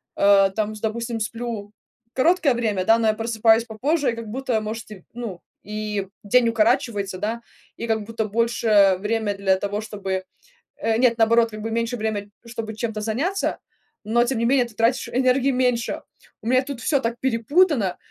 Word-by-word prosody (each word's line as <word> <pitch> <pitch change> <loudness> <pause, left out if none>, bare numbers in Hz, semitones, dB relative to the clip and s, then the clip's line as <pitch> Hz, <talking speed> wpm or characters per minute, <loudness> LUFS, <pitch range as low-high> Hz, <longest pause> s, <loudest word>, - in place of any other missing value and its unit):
а, 200 -1 +5
там, 215 +1 -2
с 210 - -11
допустим, 230 +1 -2
сплю 220 -2 -4 0.4
короткое 330 +1 +3
время, 215 -6 -1
да, 225 +2 +5
но 225 - +2
я 215 - +4
просыпаюсь 225 0 +3
попозже, 265 +5 0
и, - - -5
как 230 -1 -7
будто, 245 0 -1
может, 215 +1 -6
и, 190 -4 -11
ну, 225 -7 -6 0.2
и 210 -2 -4
день 235 +3 +3
укорачивается, 225 -4 +1
да, 225 +4 -3 0.3
и, 235 - -5
как 220 -1 0
будто, 225 +1 -3
больше 215 -3 +3
время 215 0 0
для 195 -1 +2
того, 205 +2 -3
чтобы, 195 -3 -4 0.5
э 225 -1 0
Нет, 240 -2 +3
наоборот, 230 0 +4
как 215 0 -7
бы, 225 - -3
меньше 230 +2 -1
время, 210 -2 -3 0.2
чтобы 230 -2 -5
чем-то 220 -1 -3
заняться, 275 - -1 0.4
но 235 +3 +2
тем 245 0 -1
не 230 - 0
менее 255 +1 +3
ты 235 - -15
тратишь 230 +4 +1
энергии 255 +2 +2
меньше. 250 -1 0 0.4
У 225 - -4
меня 255 +1 +4
тут 275 -2 -7
всё 285 +2 +2
так 235 -1 -3
перепутано, 260 - +2
225 Hz, 180 wpm, -23 LUFS, 210-240 Hz, 0.5 s, а